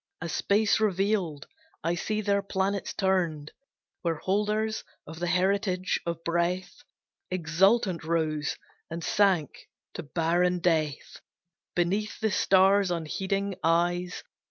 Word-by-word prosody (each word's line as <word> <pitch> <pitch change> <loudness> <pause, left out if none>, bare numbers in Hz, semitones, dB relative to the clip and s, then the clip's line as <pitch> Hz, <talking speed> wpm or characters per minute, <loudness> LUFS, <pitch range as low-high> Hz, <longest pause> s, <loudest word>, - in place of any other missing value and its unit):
A 165 - -4
space 205 +6 +2
revealed, 195 -6 0 0.4
I 170 - +1
see 215 +5 -2
their 200 -1 +1
planets 195 0 -1
turned, 175 -6 0 0.5
Where 165 -2 0
holders 210 +5 -1 0.2
of 160 +1 -9
the 175 - -1
heritage 185 +1 +1
of 170 -1 -3
breath 175 +2 -1 0.5
Exultant 185 +2 +2
rose, 155 -2 -1 0.3
and 165 +1 -5
sank 190 -7 +1 0.2
to - - -5
barren 170 +3 +1
death 160 -5 -1 0.6
Beneath 195 +5 0
the 220 -1 0
stars' 190 +1 +4
unheeding 190 +4 -2
eyes. 175 +2 +1
180 Hz, 110 wpm, -28 LUFS, 165-200 Hz, 0.6 s, stars